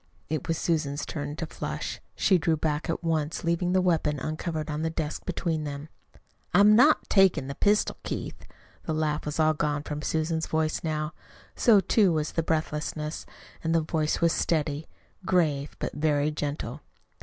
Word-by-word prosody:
It 155 -3 -2
was 165 - 0
Susan's 150 -4 -1
turn 145 -1 -4
to 165 - -3
flush. - - -5
She 190 -3 +3
drew 160 0 +1
back 150 0 -1
at 165 - -2
once, 160 -2 -1
leaving 170 +1 +1
the 185 -1 +3
weapon 160 -4 +1
uncovered 155 +2 -3
on 150 0 -3
the 160 - 0
desk 160 -2 -4
between 170 -3 -1
them. 145 +1 -6 0.7
"I'm 205 +3 +7
not 290 +7 +5
takin' 195 -8 +4
the 140 - -4
pistol, 205 +8 +2
Keith." - - -6 0.4
The 160 - -1
laugh 155 -1 -1
was 150 +2 -3
all 155 0 +4
gone 150 -1 -1
from 150 0 -5
Susan's 160 +1 -1
voice 155 0 0
now. 155 -1 -2 0.4
So, 225 -5 +6
too, 195 -1 +3
was 155 -2 -1
the 165 - 0
breathlessness. 155 -1 -2 0.3
The 165 0 +2
voice 155 -1 -1
was 170 -1 +4
steady, 155 -2 0 0.4
grave, 155 -6 +1
but - - -4
very 150 -1 +1
gentle. 145 -2 -4
155 Hz, 165 wpm, -27 LUFS, 150-165 Hz, 0.7 s, I'm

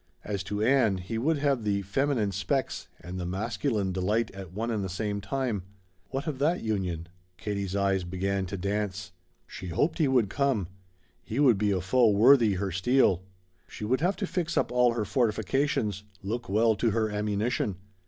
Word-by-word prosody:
As 100 -2 -3
to 105 +1 -2
Ann, 120 -5 +3
he 105 +5 -4
would 155 +6 +2
have 140 -4 +1
the 100 -1 0
feminine 115 +1 0
"specs" 115 +7 -2
and 90 +2 -6
the 90 - -3
masculine 105 +1 -1
delight 105 +5 0
at 95 -3 -9
one 115 +5 -2
and 105 -3 -1
the 95 - -3
same 100 +2 -2
time. 115 -1 -2 0.5
What 135 +2 -3
of 150 -5 -3
that 160 +5 +1
union? 90 -6 -2 0.3
Katie's 100 -2 -3
eyes 100 -1 +1
began 95 +2 -2
to 100 +2 -4
dance. 100 +1 -2 0.3
She 95 - -8
hoped 145 - 0
he 155 - +4
would 125 -5 +3
come. 120 -6 0 0.5
He 115 - -4
would 125 -8 +5
be 105 -1 +2
a 95 -2 +1
foe 115 +5 +4
worthy 115 +1 +6
her 95 +1 -2
steel. 95 0 +3 0.5
She 105 - -7
would 130 +5 +1
have 185 +4 +2
to 200 - -2
fix 175 -3 -2
up - - +1
all 125 -1 +4
her 115 -3 -1
fortifications 115 -2 0 0.2
look 115 +4 -3
well 110 +2 +3
to 115 - +2
her 110 0 0
ammunition. 105 0 -1
105 Hz, 185 wpm, -28 LUFS, 95-125 Hz, 0.5 s, worthy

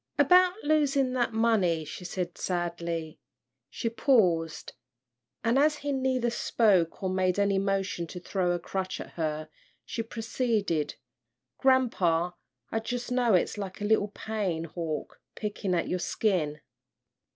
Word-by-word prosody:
"About 365 0 +6
losin' 285 -4 +2
that 240 -2 +1
money," 210 -8 +2
she 170 +4 -8
said, 180 -1 -3
sadly. 170 -2 -3 0.5
She - - -3
paused, 185 - +2 0.7
and 235 +4 +3
as 300 +1 +4
he 285 0 -3
neither 260 -3 +1
spoke 200 -7 +2
or 190 - +1
made 185 0 +1
any 200 -1 +2
motion 195 -3 -1
to 180 - -7
throw 180 0 0
a - - 0
crutch 185 +2 -4
at - - -8
her, 155 -1 -3 0.4
she 230 - -3
proceeded, 225 - -1 0.6
"Grampa, 185 -10 +3 0.4
I 225 - 0
jus' 245 +2 -4
know 245 -4 +3
it's 180 +4 +1
like 190 -2 -5
a 205 - -3
little 210 -1 +3
pain 205 -6 -3
hawk 165 -1 -5
pickin' 205 -3 -2
at 170 - 0
your 180 - -1
skin." 165 -8 0
195 Hz, 140 wpm, -28 LUFS, 175-235 Hz, 0.7 s, About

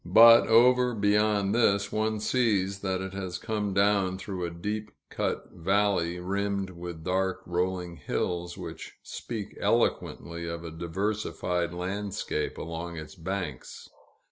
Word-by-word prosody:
But, 115 +6 +8
over 125 +1 +5
beyond 105 -1 +2
this, 100 -4 +3
one 110 0 0
sees 105 -5 +1
that 95 -1 -1
it 95 0 -5
has 95 -2 -4
come 105 -2 -2
down 100 -1 +2
through 95 -2 -4
a - - -2
deep 105 +5 -4 0.2
cut - - -2
valley, 95 -1 +1
rimmed 100 +1 -1
with 85 -2 -8
dark, 95 +1 0
rolling 90 -1 -2
hills, 85 -1 -2
which - - -8
speak 110 -4 -6
eloquently 85 0 0
of 85 0 -5
a 85 - -6
diversified 90 0 -2
landscape 95 -3 -3
along 85 +1 -5
its 80 -1 -8
banks. 90 -5 -5
95 Hz, 130 wpm, -28 LUFS, 85-105 Hz, 0.2 s, But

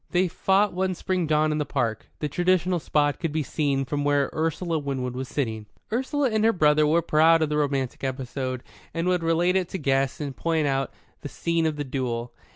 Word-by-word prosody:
They 180 +1 +2
fought 195 +4 +2
one 185 0 -1
spring 180 -2 -1
dawn 155 0 +2
in 150 - -1
the - - +1
park 115 -6 -2
the 150 - 0
traditional 180 +3 +1
spot 145 -2 +1
could 165 -3 -2
be 155 0 -1
seen 140 -2 0
from 145 +2 -2
where 145 -1 +2
Ursula 165 +1 -1
Winwood 130 -3 -3
was 130 +1 -4
sitting. 110 -8 -3 0.3
Ursula 265 +2 0
and 215 0 +1
her 225 - +5
brother 150 -5 +3
were 165 +2 +3
proud 160 +2 +4
of 155 - 0
the 150 - 0
romantic 140 -4 -1
episode, 130 -1 -3 0.3
and 165 +2 -1
would 180 -1 +2
relate 165 +2 +2
it 185 -2 +1
to - - -3
guests 135 -4 0
and 140 -3 -4
point 160 -2 0
out 135 -1 0 0.3
the 145 - -6
scene 170 +1 0
of 155 - -1
the 145 - -3
duel. 125 -3 -3
150 Hz, 210 wpm, -25 LUFS, 135-175 Hz, 0.3 s, her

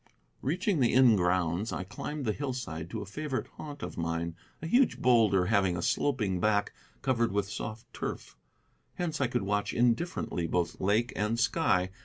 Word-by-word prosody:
Reaching 180 +4 0
the 120 -2 +3
inn 125 -4 +7
grounds, 90 +2 +1
I - - -3
climbed 130 +9 -5
the 110 - +1
hillside 125 - -4
to - - -4
a - - -9
favorite 135 +6 -3
haunt 145 -2 -8
of - - -5
mine, 85 0 -2 0.2
a - - -7
huge 245 +9 +3
boulder 110 -7 +4
having 95 -3 +2
a 85 - -3
sloping 110 -10 +1
back 105 +1 +1 0.3
covered 120 -3 +1
with 100 -1 0
soft 110 +1 -6
turf. - - -5 0.6
Hence 160 -4 -2
I 130 - +3
could 120 -3 -1
watch 105 +1 -1
indifferently 120 - +1
both 85 0 -1
lake 110 +5 +2
and 105 +3 0
sky. 120 - +2
110 Hz, 170 wpm, -30 LUFS, 95-130 Hz, 0.6 s, inn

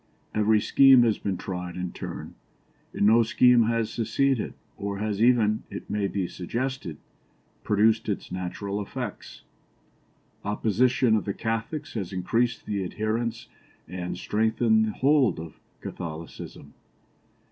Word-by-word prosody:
Every 110 0 +3
scheme 135 +3 +6
has 110 -3 +1
been 95 -2 -2
tried 90 -1 -5
in 90 -1 -4
turn, - - -7 0.6
and - - 0
no 115 +3 +6
scheme 120 +1 +5
has 115 -1 0
succeeded 130 +2 0 0.2
or 100 0 -4
has 105 0 -2
even, 115 -3 +4
it - - -8
may 105 -1 0
be 95 -2 -2
suggested, 115 - -4 0.7
produced 110 +2 +2
its 100 - -3
natural 100 +3 -4
effects. 100 - -7 1.0
Oppression 115 +3 +2
of 110 - -1
the 100 - -3
Catholics 115 +7 -3
has 100 -5 -4
increased 115 +6 0
the 100 -2 -2
adherents 110 +5 -2 0.4
and 90 0 -5
strengthened 110 +2 +2
the 110 - -2
hold 135 - +3
of 80 -1 -9 0.2
Catholicism. 80 -3 -8
110 Hz, 125 wpm, -26 LUFS, 95-115 Hz, 1.0 s, scheme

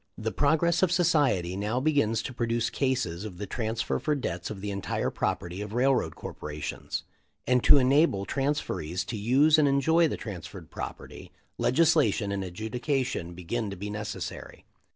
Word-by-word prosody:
"The 110 -1 -2
progress 160 +5 +2
of 185 -2 +3
society 145 - +2
now 105 +5 -1
begins 130 -6 +1
to 130 - -5
produce 115 -1 0
cases 110 -10 -1
of 100 -5 -7
the 105 - -4
transfer 110 +2 -2
for 150 - 0
debts 90 -11 -3
of 105 - -6
the 100 +1 -4
entire 100 -1 -2
property 90 +3 -2
of 105 0 -6
railroad 130 +2 +2
corporations; 75 0 -5 0.4
and 125 0 +2
to - - +8
enable 130 -6 +3
transferees 135 - -2
to 120 - -4
use 135 +9 +4
and 150 - +4
enjoy 160 +5 +4
the - - -3
transferred 90 -4 -8
property - - -7 0.3
legislation 150 -8 +3
and 100 -1 -2
adjudication 110 - -2
begin 105 +5 -3
to 100 - -5
be 100 +3 -5
necessary. 105 0 -6
115 Hz, 155 wpm, -28 LUFS, 100-140 Hz, 0.4 s, to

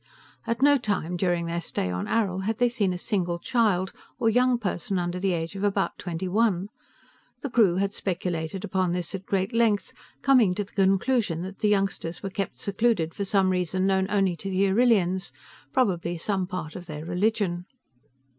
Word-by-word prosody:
At 230 +3 0
no 285 -1 +6
time, 185 -7 -1
during 175 -1 0
their 170 +1 -2
stay 90 - -2
on 90 0 -3
Arrill, 190 -4 0
had 220 +1 -1
they 245 0 +3
seen 215 -6 0
a 180 - -2
single 175 -3 -1
child, 195 -2 +1 0.3
or 225 - +2
young 250 +1 +3
person 195 -2 -2
under 175 0 -2
the 190 0 +1
age 165 +2 -3
of 195 - -4
about 200 -1 +1
twenty 175 +1 -4
one. 200 -1 +1 0.7
The 280 - -4
crew 210 -8 +4
had 195 +1 0
speculated 180 -1 -3
upon 185 -4 0
this 175 -2 -2
at 195 -1 -6
great 195 +3 0
length, 230 -3 +2 0.3
coming 245 -9 +5
to 205 - -1
the 200 - -16
conclusion 195 -2 +1
that 190 +1 -8
the 210 - +2
youngsters 195 -4 -1
were 195 - -3
kept 195 +1 -4
secluded 200 -5 0
for 200 - -3
some 195 -1 +2
reason 185 +1 0
known 190 -1 +2
only 195 -4 +2
to 195 - -5
the 195 +1 +2
Arrillians, 190 -5 +2 0.4
probably 175 -9 +1
some 190 +1 -1
part 180 -4 -5
of 180 -2 -8
their 155 -1 -6
religion. 180 0 0
190 Hz, 185 wpm, -26 LUFS, 175-210 Hz, 0.7 s, no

